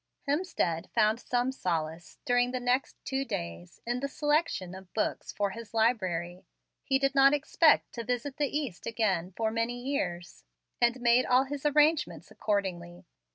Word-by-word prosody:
Hemstead 285 - -1
found 220 0 +3
some 245 +1 0
solace, 165 -7 -3
during 245 0 +3
the 255 0 -2
next 250 +2 0
two 270 0 -1
days, 85 - -6
in 240 +1 -1
the 280 - -2
selection 295 - 0
of 190 -1 -11
books 215 - -1
for 200 -1 -1
his 230 +1 -9
library. 185 -6 0 0.4
He 270 - +2
did 275 0 +1
not 275 +1 +6
expect 310 +2 +3
to 235 - -5
visit 250 +4 -3
the 295 -2 +1
East 280 - -4
again 195 -6 0
for 220 -1 0
many 230 +2 -1
years, 180 -10 -3 0.4
and 240 +1 +2
made 240 +1 +4
all 250 +1 +5
his 285 +1 -3
arrangements 300 +1 +2
accordingly. 180 -4 -3
240 Hz, 155 wpm, -29 LUFS, 185-270 Hz, 0.4 s, not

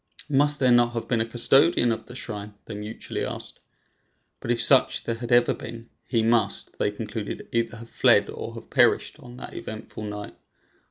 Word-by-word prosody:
"Must 145 +1 +3
there 130 -2 +4
not 120 0 +4
have 115 - -4
been 115 -3 +1
a 115 - -1
custodian 120 +2 +3
of 110 - -4
the 125 - -10
shrine?" 105 -4 -6
they 115 - -7
mutually 105 +2 -5
asked; - - -6 0.8
but - - -7
if 120 -1 +2
such 135 -2 +4
there 115 - -2
had 120 +1 -6
ever 120 0 +5
been, 115 0 -9 0.2
he 115 -3 +1
must, 115 -3 +1
they - - +2
concluded, 105 0 -6
either 115 0 -1
have 115 0 -10
fled - - +4
or - - -7
have - - -11
perished - - +3
on 120 0 -12
that - - -9
eventful 110 0 -8
night. 105 0 -7
115 Hz, 185 wpm, -25 LUFS, 110-120 Hz, 0.8 s, ever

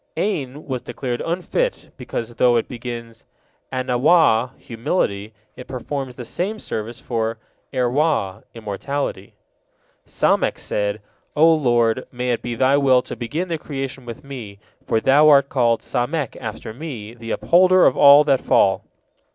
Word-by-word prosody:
'Ain 150 -8 -2
was 130 -3 -3
declared 125 -3 -4
unfit, 185 - -2
because, 115 0 -5
though 120 0 +3
it 115 - 0
begins 115 -2 -7 0.5
'Anawah, 130 -1 +3
humility, 110 - -2 0.2
it 125 - -10
performs 130 0 -5
the 125 - -8
same 195 - -3
service 115 - -5
for 115 -2 -2 0.3
'Erwah, 125 - 0
immorality. 110 0 -4 0.7
Samek - - +1
said: 105 0 -2 0.3
"O 160 +2 +6
Lord, 120 -5 +1
may 125 0 -2
it 120 - -1
be 120 -1 -4
Thy 130 +3 +3
will 130 -3 +4
to - - -7
begin 150 +10 -3
the 165 -2 -3
creation 135 -3 -5
with 120 +4 -8
me, 120 -8 -8 0.3
for 110 - +2
Thou 145 +6 +5
art 140 -2 +5
called 120 -3 +2
Samek, 135 +2 -2
after 110 0 -7
me, 120 -6 -7
the 115 -1 -10
Upholder 185 +7 +4
of - - +4
all 145 +1 +8
that 140 -3 +2
fall." 95 -1 +3
125 Hz, 145 wpm, -21 LUFS, 115-145 Hz, 0.7 s, all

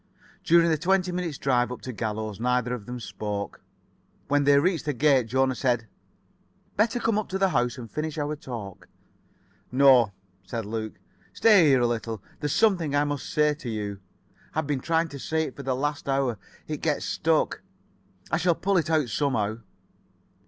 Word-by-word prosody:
During 170 0 +5
the 155 - +1
twenty 185 +2 +2
minutes' 175 -5 -3
drive 125 -2 +1
up 125 - -6
to 130 - -6
Gallows 110 -2 -4
neither 125 0 +1
of 110 -5 -6
them 125 0 -5
spoke. 105 -3 -5 0.7
When 145 0 +2
they 140 0 +6
reached 165 0 +1
the 150 - 0
gate, 135 -3 +3
Jona 130 +2 +2
said: 120 -3 0 0.9
"Better 225 +3 +2
come 225 -2 +1
up 215 - -5
to 190 - -1
the 195 0 +3
house 125 -4 0
and 120 -2 -7
finish 155 0 -3
our 150 0 -2
talk." 115 -9 -8 0.8
"No," 130 -4 +6 0.3
said 115 +3 -5
Luke; 110 0 -4 0.4
"stay 210 -7 +6
here 135 -3 +4
a - - +3
little. 115 -2 -2 0.2
There's 150 -1 -2
something 175 -9 +2
I 145 - +3
must 145 -2 -3
say 150 0 +3
to 140 -4 -7
you. 105 -3 -4 0.6
I've 155 0 0
been 140 -2 -1
trying 165 +2 +1
to 140 - -8
say 160 +4 -1
it 145 - -6
for - - -7
the 135 -1 -1
last 145 +1 -2
hour. 135 -5 0 0.3
It 155 - -3
gets 150 -3 0
stuck. 160 -1 0 0.7
I 155 - +2
shall 175 0 +2
pull 195 +3 +1
it 165 -2 0
out 155 -5 +2
somehow." 115 -3 -1
140 Hz, 180 wpm, -26 LUFS, 120-160 Hz, 0.9 s, they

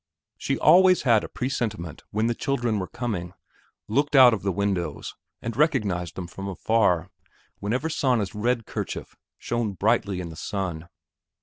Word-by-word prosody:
She - - -2
always 185 +3 +6
had 115 -5 +4
a - - -6
presentiment 110 - -3
when 110 +2 0
the 120 - +1
children 120 -4 -1
were 95 - -3
coming, 100 -8 -4 0.5
looked 140 +7 +1
out 130 -3 +9
of 110 - -2
the 100 - 0
windows, 95 -6 -2 0.3
and 115 -1 -4
recognized 105 - +1
them 90 - -5
from 95 +3 -7
afar, 95 -3 +1 0.5
whenever 125 +10 -1
Sanna's 125 - 0
red 115 +2 0
kerchief - - -5 0.2
shone 120 -3 -2
brightly 100 0 +1
in 90 -2 -5
the 80 - -9
sun. 85 -2 -4
105 Hz, 150 wpm, -25 LUFS, 95-125 Hz, 0.5 s, out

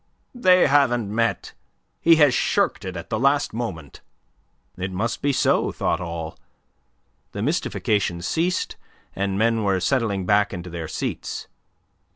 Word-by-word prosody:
"They 185 -7 +5
haven't 120 -7 +2
met. 115 +1 -1 0.5
He 165 0 +6
has 150 -5 +5
shirked - - +1
it 90 -1 -5
at 85 - -9
the 110 - 0
last 140 +3 +2
moment." 95 - -6 0.7
It 95 +1 -4
must 115 +6 -2
be 145 - +2
so, 135 - +2
thought - - -1
all; 85 -2 -6 0.9
the 100 - -3
mystification 105 - -1
ceased, 165 - -1 0.4
and 100 0 -1
men 115 +1 +2
were 100 -2 +1
settling 100 -1 0
back 105 0 +2
into 90 0 -7
their 85 -2 -5
seats. - - -4
105 Hz, 140 wpm, -23 LUFS, 90-135 Hz, 0.9 s, He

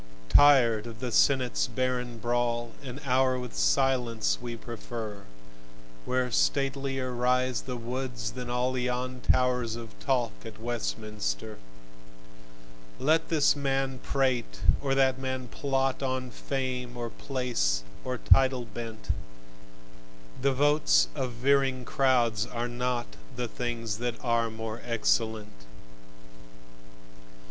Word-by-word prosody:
Tired 120 - +6
of 115 -1 -9
the 125 0 -3
Senate's 130 +1 +3
barren 125 -2 -2
brawl, 120 0 0
An 135 -1 -7
hour 130 0 +3
with 125 -1 -6
silence 115 - +2
we 120 -1 -5
prefer, 110 -3 -7 0.8
Where 125 -1 0
statelier 135 -1 0
rise 125 0 +1
the 125 -2 -5
woods 125 -1 -4
than 125 0 -6
all 125 +1 0
Yon 125 0 -2
towers 125 -3 +2
of 115 -2 -8
talk 125 -4 +1
at 110 -2 -9
Westminster. 110 -2 -3 1.4
Let 160 +3 +2
this 150 -3 +4
man 135 -2 -1
prate 130 -4 0 0.2
and 135 -1 +1
that 130 -1 +3
man 130 -1 -3
plot, 135 -1 0
On 130 -1 -2
fame 125 -1 -3
or 120 -1 -4
place 120 - -1 0.2
or 130 0 -2
title 130 0 +4
bent: 115 0 -5 1.3
The 140 +1 +3
votes 135 - +4
of 125 - -2
veering 135 +1 +2
crowds 120 -5 +2
are 120 -1 -3
not 125 0 -1 0.3
The 125 -1 -2
things 115 -3 -3
that 120 -1 -1
are 115 -1 +2
more 110 0 -6
excellent. 110 - -1
125 Hz, 115 wpm, -28 LUFS, 115-130 Hz, 1.4 s, Tired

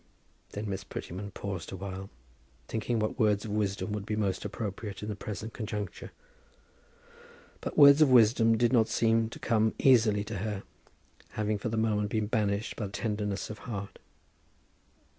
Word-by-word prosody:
Then 105 +1 -4
Miss 95 -1 -3
Prettyman 95 +2 -6
paused 95 -3 -6
awhile, 95 0 -6 0.6
thinking 115 +1 -1
what 110 +3 -2
words 105 -2 +2
of 105 - -5
wisdom 105 0 -1
would 105 -1 -3
be 105 +1 -3
most 100 -3 -1
appropriate 105 -1 -5
in 105 - -4
the 105 - -3
present 110 +2 -6
conjuncture. 105 -3 -5 1.5
But - - -6
words 140 0 +9
of 150 - +7
wisdom 115 -2 +5
did 120 +2 +2
not 115 -3 +5
seem 115 -1 +2
to - - -9
come 110 -2 +1
easily 110 -6 +4
to 105 0 -5
her, 105 -1 -3 0.7
having 105 -1 -1
for 115 - -3
the 115 - -2
moment 105 -2 +1
been 110 0 0
banished 105 -1 -1
by 105 - -2
tenderness 105 -1 -3
of 105 - -8
heart. 100 -3 -6
105 Hz, 160 wpm, -29 LUFS, 100-115 Hz, 1.5 s, words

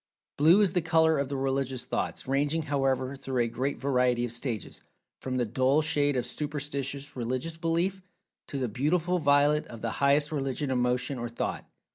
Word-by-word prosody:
Blue 165 +8 +6
is 195 -4 +2
the 180 - +2
color 160 -1 +3
of 140 -1 -1
the 140 - -2
Religious 135 -2 -1
thoughts, - - -3
ranging, 145 +4 +1
however, 135 -2 0
through 130 -2 -1
a - - -1
great 130 +5 -2
variety 125 -3 +1
of 120 - -5
stages, 120 -2 -4 0.4
from 130 -1 -3
the 120 - +1
dull 130 +7 +2
shade 145 -2 +2
of 125 -2 0
superstitious 140 -1 -4
religious 130 +6 -3
belief, 170 +4 0 0.5
to 140 - -5
the 130 -2 -1
beautiful 165 - 0
violet 145 0 +3
of 115 -2 -10
the 115 - -1
highest 145 +2 +3
religious 135 -1 -2
emotion 125 +1 0
or 120 0 -4
thought. 115 - -4
140 Hz, 175 wpm, -28 LUFS, 125-150 Hz, 0.5 s, Blue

